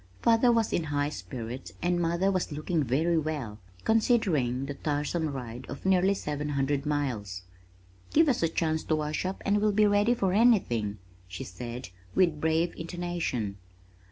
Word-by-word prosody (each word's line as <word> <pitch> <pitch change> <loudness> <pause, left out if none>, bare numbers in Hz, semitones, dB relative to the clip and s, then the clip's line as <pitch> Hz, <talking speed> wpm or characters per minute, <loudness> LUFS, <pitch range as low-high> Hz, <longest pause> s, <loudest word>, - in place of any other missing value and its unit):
Father 230 +1 +5
was 230 -2 +1
in 170 - 0
high 145 -1 0
spirits 120 +2 -7
and 175 0 +1
mother 170 +3 +1
was 185 -3 -1
looking 155 +2 -1
very 160 +7 +2
well 145 -9 -4 0.2
considering 180 - +2
the 140 - -4
tiresome 150 +3 -1
ride 125 -4 -6
of 140 - -8
nearly 190 +1 +4
seven 150 -4 -3
hundred 140 0 0
miles. 115 -11 -2 0.7
"Give 320 +1 +5
us 265 - +2
a 165 - +2
chance 160 -1 0
to 155 - +1
wash 155 +2 -2
up 190 +1 -4
and 205 +1 +2
we'll 210 0 +3
be 210 +1 +4
ready 205 +3 +3
for 195 -5 0
anything," 155 - +3 0.3
she 90 - -6
said 120 +5 -7 0.3
with 170 -5 +3
brave 160 +2 +1
intonation. 165 - -3
155 Hz, 160 wpm, -28 LUFS, 135-185 Hz, 0.7 s, Father